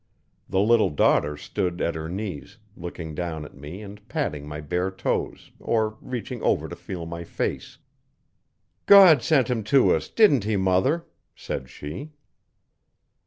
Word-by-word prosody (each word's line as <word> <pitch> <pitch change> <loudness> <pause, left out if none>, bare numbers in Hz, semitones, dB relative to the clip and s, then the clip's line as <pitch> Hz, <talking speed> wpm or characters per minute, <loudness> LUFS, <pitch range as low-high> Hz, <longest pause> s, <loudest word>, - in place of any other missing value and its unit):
The 95 - +1
little 115 +1 +4
daughter 75 0 +2
stood 85 +3 -3
at 85 - 0
her 80 0 -5
knees, 95 -5 -6 0.2
looking 85 -2 -7
down 80 -2 -4
at - - -12
me 75 +9 -9
and 100 0 -10
patting 75 0 -3
my 75 0 -6
bare 90 +5 -1
toes 95 - -3
or 110 -1 0
reaching 125 -4 -5
over - - +1
to - - -7
feel 85 -3 -7
my 85 +1 -6
face. - - -4 1.1
'God 185 -9 +9
sent 135 -6 +3
him 120 -4 -1
to 130 +4 +4
us - - -2
didn't 175 - +4
he, 105 0 0
mother?' 95 - +1 0.3
said 65 -2 -6
she. 80 - -8
95 Hz, 150 wpm, -25 LUFS, 80-115 Hz, 1.1 s, God